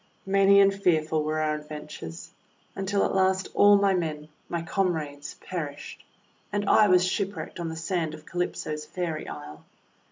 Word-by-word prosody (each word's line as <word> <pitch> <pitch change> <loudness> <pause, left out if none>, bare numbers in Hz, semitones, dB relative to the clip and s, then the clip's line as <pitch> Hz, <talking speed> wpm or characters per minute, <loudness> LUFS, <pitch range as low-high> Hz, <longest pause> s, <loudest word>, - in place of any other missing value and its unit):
Many 195 0 +5
and 195 0 +5
fearful 160 -5 +1
were 155 +1 -1
our 155 -1 +1
adventures, 150 - -8 0.4
until 195 +1 0
at - - -1
last 190 0 +2
all 205 0 +7
my 200 -1 +3
men 155 -4 -3
— - - -38
my 170 -1 -2
comrades 160 -6 -2
— - - -20
perished, 150 -5 -6 0.5
and 205 -1 -1
I 215 - +6
was 180 -1 +5
shipwrecked 195 0 -3
on 170 -1 -3
the 160 - -5
sand 160 -1 -2
of 155 - -15
Calypso's 155 -3 -3
Fairy 165 -1 -4
Isle. 75 +1 -9
170 Hz, 165 wpm, -27 LUFS, 150-195 Hz, 0.5 s, all